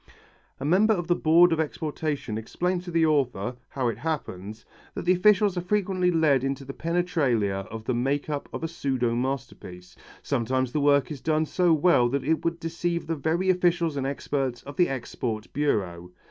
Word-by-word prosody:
A 135 - -4
member 205 +8 +4
of 175 -3 -3
the 175 - +2
board 170 +2 +5
of 160 - -1
exportation 150 -5 -3
explained 175 +11 -2
to - - -6
the 165 -1 +2
author, 125 -7 0
how 130 -3 -2
it 115 -2 -2
happens, 110 - -5 0.3
that - - -5
the 180 - +5
officials 200 +1 +4
are - - -3
frequently 185 -1 +1
led 155 -6 +3
into 135 0 -3
the 135 - -7
penetralia 140 - 0
of 110 0 -7
the 130 - 0
make 135 +4 -1
up 145 -2 -4
of - - -6
a - - 0
pseudo 135 -8 -1
masterpiece. 120 -8 -5 0.3
Sometimes 130 +2 0
the 150 - 0
work 140 -1 +3
is 140 -4 -6
done 155 0 +1
so 175 +2 +2
well 155 -6 +4
that 140 +1 -1
it 160 +3 0
would 170 0 -1
deceive 170 +1 -2
the 165 - -2
very 165 +5 +1
officials 175 -3 +1
and 135 -1 -1
experts 135 -3 -2
of 140 0 -9
the 175 +2 +3
export 120 -4 -4
bureau. 90 -12 -1
145 Hz, 190 wpm, -26 LUFS, 125-170 Hz, 0.3 s, board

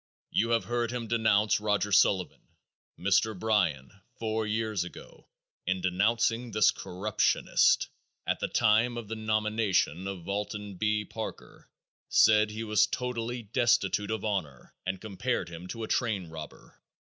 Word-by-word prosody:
You 115 - +1
have 115 -1 +1
heard 120 -1 -1
him 120 -1 -4
denounce 110 -2 +3
Roger 105 -1 0
Sullivan. 95 -1 +3 0.6
Mr. 100 +3 +2
Bryan, 90 -11 0 0.3
four 110 -1 -2
years 110 -3 -1
ago, 90 - -12 0.4
in 95 0 +1
denouncing 115 +6 +1
this 105 -1 +4
corruptionist, 100 +3 +1 0.4
at - - -1
the - - -1
time 115 +3 +2
of 115 -3 -7
the 110 - -3
nomination 110 -5 0
of 95 -4 -6
Alton 105 0 -3
B. 105 +1 0
Parker, - - -8 0.4
said 105 -1 +5
he 110 +2 -5
was 105 -1 +3
totally 120 0 -3
destitute 115 -3 +1
of 110 -1 -2
honor 90 - -3
and 95 0 -2
compared 110 -1 -2
him 85 +1 -9
to 115 +3 -6
a - - -3
train 110 -7 0
robber. 80 -2 -11
105 Hz, 140 wpm, -29 LUFS, 95-115 Hz, 0.6 s, said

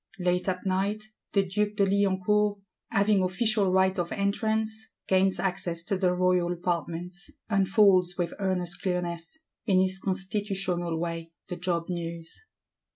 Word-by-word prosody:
Late 180 0 0
at 185 +1 -3
night, 200 +3 -1 0.2
the 200 - +4
Duke 205 +2 -1
de 200 -2 +3
Liancourt, 200 +1 +2 0.3
having 200 0 +3
official 200 +1 +2
right 190 +1 +3
of 170 -1 -2
entrance, 220 +2 -1
gains 190 -1 +3
access 175 -2 -1
to 195 +3 -1
the 185 -1 +2
Royal 180 -1 +2
Apartments; 175 +1 -3 0.2
unfolds, 190 -2 +4
with 175 -2 -1
earnest 180 -3 -2
clearness, 175 - -2 0.3
in 190 -3 +4
his 190 0 +1
constitutional 190 -3 -2
way, 165 -1 -4 0.2
the 180 - -3
Job's 175 -1 -2
news. 170 - -6
185 Hz, 135 wpm, -28 LUFS, 175-200 Hz, 0.3 s, the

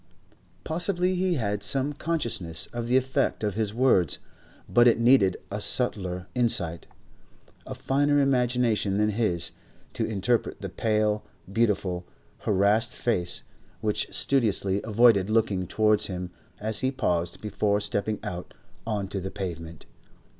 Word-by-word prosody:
Possibly 180 +2 +1
he 185 -1 +1
had 105 -6 -1
some 135 +7 0
consciousness 120 - -3
of 120 -1 -3
the 125 +2 +4
effect 130 -3 0
of 105 -2 0
his 105 0 -1
words, 110 - +3 0.5
but 120 0 +5
it 120 - +5
needed 115 -6 +4
a 105 +1 -3
subtler 95 -6 -1
insight, 90 -9 0 0.8
a - - -5
finer 145 +2 +2
imagination 125 -6 +2
than 105 0 +2
his, 100 -6 -1 0.4
to - - -2
interpret 110 +3 0
the 100 - -5
pale, 105 +1 0 0.3
beautiful, 100 -6 +1 0.4
harassed 105 +3 +2
face 90 -7 -1 0.4
which 105 -2 0
studiously 100 -7 +1
avoided 110 -3 +4
looking 105 -5 +1
towards 105 +1 +2
him 90 -1 -5 0.3
as 110 0 -1
he 130 - +1
paused 90 -10 -1
before 105 0 0
stepping 105 +1 -1
out 90 -4 -6 0.3
on 105 -3 -1
to 100 - -4
the 95 - -4
pavement. 85 -5 -6
105 Hz, 130 wpm, -26 LUFS, 95-120 Hz, 0.8 s, but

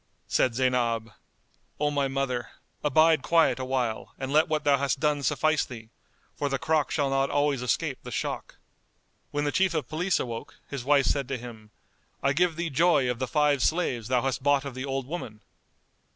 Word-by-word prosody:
Said 125 -3 +2
Zaynab, 120 -3 0 0.7
"O 145 0 +1
my 140 -1 +1
mother, 135 -3 -2 0.4
abide 155 +1 +4
quiet 165 -3 +3
awhile 130 -4 -2
and 135 +1 -4
let 155 +1 +5
what 155 -1 -1
thou 140 -2 +3
hast 140 -1 0
done 150 -1 +1
suffice 155 +2 +2
thee, 115 -3 -10 0.5
for 145 - -1
the 135 - 0
crock 155 +1 +1
shall 140 -3 0
not 135 0 +1
always 145 -2 +1
escape 115 -3 -1
the - - -9
shock." - - -4 0.7
When 145 0 -2
the 145 - 0
Chief 185 0 +2
of 155 - -1
Police 175 +5 0
awoke, 115 -2 -5
his 140 -4 -5
wife 140 0 +4
said 140 +1 0
to 135 -1 -2
him, 115 -3 -10 0.5
"I 135 +1 +3
give 175 +2 +2
thee 170 -1 -3
joy 140 -4 +3
of 120 - -5
the 130 - -1
five 145 -1 +2
slaves 125 -9 0
thou 125 -1 +1
hast 135 -3 -1
bought 145 -1 +2
of 140 - -5
the 130 +2 -5
old 135 -1 -2
woman." 125 -8 -6
140 Hz, 190 wpm, -27 LUFS, 125-150 Hz, 0.7 s, let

